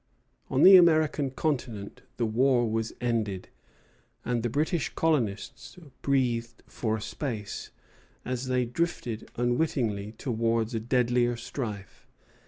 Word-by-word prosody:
On 135 - +2
the 190 0 +11
American 155 -5 +4
continent 125 -8 -3 0.2
the 120 - +1
war 120 +2 +3
was 115 0 -1
ended, 110 -6 -2 0.8
and 120 -1 0
the 120 - -1
British 155 - 0
colonists 135 - -1 0.2
breathed 120 -4 0
for 110 -2 -2
a - - -8
space, 115 -9 -5 0.6
as 125 0 -3
they 125 -1 +1
drifted 120 -4 -3
unwittingly 120 -5 0
towards 115 -1 -1
a 115 - 0
deadlier 120 0 +1
strife. 110 -5 -6
120 Hz, 115 wpm, -28 LUFS, 110-135 Hz, 0.8 s, the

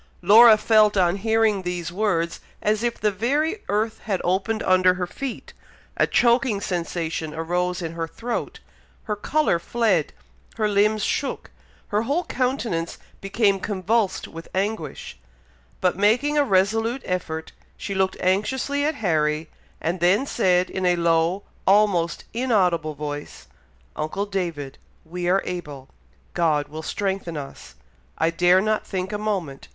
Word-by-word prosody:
Laura 220 +4 +8
felt, 215 -1 +4
on 180 0 +3
hearing 220 -1 +2
these 180 -2 -4
words, 175 -4 -1 0.2
as 210 +1 0
if 240 0 -2
the 210 - +1
very 295 - 0
earth 215 +2 0
had 195 -4 -1
opened 195 +5 0
under 185 0 +4
her 180 -1 -2
feet, 265 +7 -7 0.4
a - - +2
choking 235 -3 +3
sensation 165 -4 -3
arose 180 +2 -1
in 165 - -3
her 165 -1 -3
throat, 235 +7 -4 0.4
her 210 - -2
colour 265 - +1
fled, 200 -5 +1 0.4
her 215 -1 +1
limbs 210 +1 +2
shook, 280 - -2 0.4
her 210 +1 +1
whole 285 +10 0
countenance 245 - -2 0.2
became 195 0 +1
convulsed 205 +1 -1
with 165 +1 -10
anguish, 205 +4 -3 0.6
but 180 -1 +2
making 230 +10 +2
a 295 - +4
resolute 225 +3 +1
effort, 160 -3 -3 0.3
she 200 - -5
looked 190 -1 0
anxiously 260 +10 0
at 305 +1 0
Harry, 155 -2 0 0.3
and 175 +3 -2
then 185 +9 +3
said, 185 -8 +2
in 190 - -4
a 180 -1 +3
low, 170 +3 +1 0.2
almost 190 -4 +3
inaudible 180 - +1
voice, 145 0 -6 0.5
"Uncle 155 +7 -2
David! 170 -9 -4 0.3
we 175 +2 -3
are 195 +2 +2
able, 150 -7 -6 0.4
God 155 -4 +1
will 155 +1 -7
strengthen 190 -1 -3
us. 135 - -9 0.4
I 160 +1 +2
dare 175 +2 +4
not 215 +1 0
think 190 0 -4
a 205 - -2
moment. 185 -10 -3
190 Hz, 140 wpm, -23 LUFS, 170-220 Hz, 0.6 s, Laura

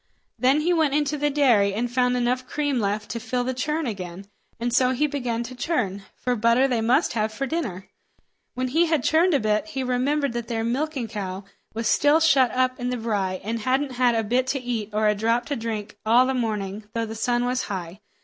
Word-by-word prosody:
Then 265 +5 +3
he 350 +3 +2
went 315 -4 +2
into 300 0 +1
the 295 0 0
dairy 235 -9 +3
and 240 +2 -2
found 250 0 +2
enough 250 +1 0
cream 290 -3 -1
left 210 0 -2
to 235 - -3
fill 245 +2 -2
the 260 +1 -2
churn 300 +5 -2
again, 190 -4 -6 0.3
and 240 0 -2
so 255 0 +3
he 280 +4 +1
began 250 -5 -2
to 245 +2 -8
churn, 235 - -2
for 250 0 -1
butter 235 +4 +3
they 245 -4 0
must 235 +3 +2
have 215 -1 0
for 270 +5 -3
dinner. 240 - -4 0.7
When 255 0 -1
he 330 +6 +3
had 315 -5 +1
churned 330 +1 +3
a - - +3
bit, 215 +6 0
he 270 -4 -3
remembered 260 +2 0
that 235 -1 -4
their 225 -1 -2
milking 265 +1 -2
cow 200 -3 -5 0.3
was 230 0 -1
still 290 +2 +4
shut 275 -6 +4
up 255 +1 0
in 245 0 -2
the 250 - -2
brye, 200 -5 -2
and 225 +3 -2
hadn't 260 +4 0
had 245 -1 +2
a 225 - +1
bit 250 +4 +1
to 275 +1 0
eat 235 -4 -3
or 215 0 +1
a 210 - +4
drop 230 +3 0
to 285 - -2
drink 220 -3 -5
all 235 +4 +5
the 265 - 0
morning, 210 -4 -3
though 230 0 0
the 220 - -6
sun 240 +2 0
was 250 +1 -1
high. 185 -1 -6
245 Hz, 225 wpm, -24 LUFS, 220-270 Hz, 0.7 s, all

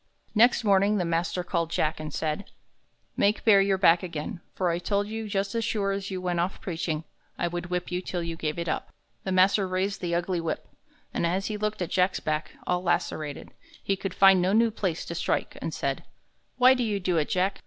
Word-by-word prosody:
Next 240 +2 +5
morning 200 0 +4
the 180 - 0
master 170 +2 -1
called 170 -2 -1
Jack, 155 -1 0
and 155 -1 -5
said, 155 +6 -3 0.7
"Make 205 +2 +1
bare 200 -3 +7
your 195 -1 +2
back 175 -2 +5
again; 170 -1 -5
for 180 -2 +1
I 170 - -1
told 200 +3 0
you 220 +1 -4
that - - -7
just 195 -1 -1
as 230 -1 0
sure 205 -3 0
as 195 0 -3
you 190 -1 -3
went 180 -1 -1
off 180 +3 -1
preaching, 165 -3 -3 0.3
I 175 - 0
would 175 0 -4
whip 180 0 -3
you 180 0 -1
till 180 -2 -3
you 165 0 -4
gave 155 -1 -3
it 170 0 -3
up." - - -2 0.3
The 190 - -1
master 190 +1 +4
raised 190 +2 -1
the 170 -2 -1
ugly 175 0 -1
whip, 160 -2 -3 0.5
and - - -1
as 190 +3 -1
he 215 - -2
looked 210 -2 -2
at 175 - -6
Jack's 185 0 +2
back, 155 0 -2
all 180 0 0
lacerated, 155 -4 -2 0.3
he 195 - +1
could 195 0 -5
find 195 -1 +7
no 185 +2 +2
new 230 +1 +4
place 185 -6 -2
to - - -5
strike, - - -1
and - - -3
said: - - -2 0.5
"Why 255 +1 +7
do 255 - -1
you 210 -3 -1
do 180 -2 0
it, 150 - +1
Jack? 190 +2 0
185 Hz, 225 wpm, -27 LUFS, 170-200 Hz, 0.7 s, bare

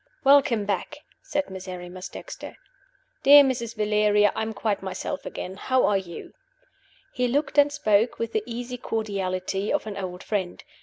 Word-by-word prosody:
"Welcome 270 -6 +5
back!" 200 -2 -2 0.2
said 290 -8 -3
Miserrimus 185 -1 -7
Dexter. - - -9 0.6
"Dear 285 +1 +9
Mrs. 235 -4 -2
Valeria, 210 -1 +3
I - - -2
am 220 0 -2
quite 215 -1 -2
myself 190 -1 -5
again. 190 +1 -6
How 260 +4 +2
are 200 -1 +3
you?" 175 -3 -9 0.8
He 250 0 0
looked 290 +3 +1
and 290 0 +5
spoke 225 -6 +2
with 230 -1 -3
the 220 - +1
easy 245 +1 -5
cordiality 195 -3 -2
of - - 0
an 210 -2 -6
old 180 -2 -5
friend. 190 -4 -3
210 Hz, 155 wpm, -25 LUFS, 190-245 Hz, 0.8 s, Dear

